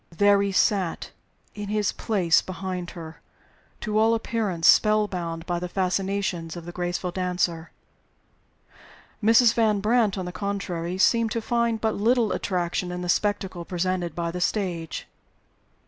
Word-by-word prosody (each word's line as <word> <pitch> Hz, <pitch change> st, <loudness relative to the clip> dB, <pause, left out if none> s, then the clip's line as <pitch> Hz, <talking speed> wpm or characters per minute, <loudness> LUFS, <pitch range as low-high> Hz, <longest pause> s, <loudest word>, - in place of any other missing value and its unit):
There 200 Hz, +3 st, +4 dB
he 200 Hz, 0 st, 0 dB
sat, 190 Hz, -2 st, +1 dB, 0.4 s
in 205 Hz, -1 st, -6 dB
his 210 Hz, -2 st, +1 dB
place 185 Hz, -7 st, +2 dB
behind 180 Hz, -1 st, -5 dB
her, 160 Hz, -1 st, -9 dB, 0.6 s
to 215 Hz, -1 st, 0 dB
all 225 Hz, +1 st, +4 dB
appearance 210 Hz, -7 st, -1 dB
spell 215 Hz, -1 st, +5 dB
bound 170 Hz, -3 st, -5 dB
by 175 Hz, -1 st, -1 dB
the 180 Hz, 0 st, -5 dB
fascinations 190 Hz, -2 st, -1 dB
of 170 Hz, -, -8 dB
the 175 Hz, -, -7 dB
graceful 175 Hz, +1 st, -3 dB
dancer. 175 Hz, -2 st, -1 dB, 1.5 s
Mrs. 225 Hz, +2 st, +6 dB
Van 215 Hz, -3 st, +2 dB
Brandt, 215 Hz, -1 st, +2 dB
on 185 Hz, -, -3 dB
the 180 Hz, -, -5 dB
contrary, 185 Hz, -3 st, -3 dB
seemed 230 Hz, +3 st, +3 dB
to 230 Hz, -, -1 dB
find 235 Hz, 0 st, 0 dB
but 220 Hz, -1 st, +1 dB
little 225 Hz, 0 st, +2 dB
attraction 180 Hz, -1 st, -2 dB
in 180 Hz, 0 st, -4 dB
the 175 Hz, -, -4 dB
spectacle 190 Hz, -2 st, 0 dB
presented 180 Hz, -1 st, -2 dB
by 170 Hz, -1 st, -2 dB
the 180 Hz, +1 st, -5 dB
stage. 175 Hz, -5 st, -2 dB
185 Hz, 145 wpm, -25 LUFS, 175-210 Hz, 1.5 s, Mrs